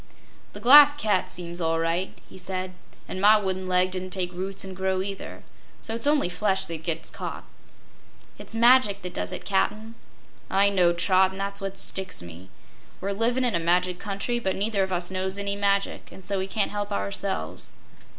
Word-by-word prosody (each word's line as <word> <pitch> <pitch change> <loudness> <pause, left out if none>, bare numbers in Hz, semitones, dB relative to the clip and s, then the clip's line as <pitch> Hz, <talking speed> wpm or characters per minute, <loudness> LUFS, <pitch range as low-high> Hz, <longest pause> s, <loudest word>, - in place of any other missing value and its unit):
"The - - -7
Glass 290 +3 +8
Cat 210 -9 0
seems 175 0 -5
all 165 0 +1
right," 165 +3 -1
he - - -15
said, 185 0 -4 0.3
"an' 185 - -5
my 210 +2 +7
wooden 190 -2 -2
leg 185 0 +2
didn't 185 0 -3
take 185 -1 -2
roots 190 +2 -4
and 190 -1 -7
grow, 190 0 -1
either. 195 0 -7 0.4
So 225 - -6
it's 230 +4 -1
only 295 -8 +3
flesh 190 +1 0
that 165 -2 -6
gets 165 0 -3
caught." - - -6 1.0
"It's - - -9
magic 235 -4 +4
that 180 -1 -5
does - - -3
it, - - -7
Cap'n!" 210 +3 -1 0.6
"I 200 +1 +4
know, 180 -3 +4
Trot, 185 +2 +3
and 190 +1 -9
that's 200 +1 -2
what 195 0 -5
sticks 190 - -2
me. 85 +2 -12 0.5
We're 195 +2 -3
livin' 235 +5 +1
in 240 - +1
a 170 - +1
magic 180 +2 +1
country, 215 +4 -2
but 190 -5 -1
neither 205 0 0
of 190 0 -1
us 175 0 -1
knows 190 +1 -2
any 200 0 -1
magic 200 0 0
an' 190 - -13
so 200 +1 -2
we 190 - -2
can't 205 +1 -1
help 205 0 -4
ourselves." 100 - -3
190 Hz, 190 wpm, -25 LUFS, 180-200 Hz, 1.0 s, Glass